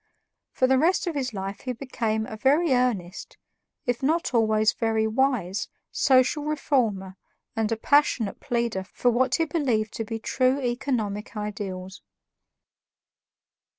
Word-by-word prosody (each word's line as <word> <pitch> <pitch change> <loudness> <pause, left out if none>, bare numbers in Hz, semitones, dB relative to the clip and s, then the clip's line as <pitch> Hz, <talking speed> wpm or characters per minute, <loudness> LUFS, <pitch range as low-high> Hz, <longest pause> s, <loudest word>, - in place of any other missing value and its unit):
For 255 - +2
the 260 0 +3
rest 350 +7 +2
of 345 - -2
his 265 -4 -2
life 195 -1 -5
he 255 - -3
became 225 -4 -2
a 220 - -7
very 280 +7 +3
earnest, 220 -8 -1 0.5
if 245 -1 -1
not 315 +2 0
always 220 -2 +3
very 225 -1 0
wise, 220 -5 0 0.2
social 265 +2 +3
reformer 230 -11 -1 0.4
and 225 0 0
a 225 - 0
passionate 255 -5 +2
pleader 235 -5 -1
for 245 +5 0
what 255 +1 +2
he 330 - +1
believed 255 -9 0
to 225 - -3
be 225 +1 -4
true 255 +4 +1
economic 240 -4 -2
ideals. 200 -3 -5
235 Hz, 135 wpm, -25 LUFS, 215-265 Hz, 0.5 s, the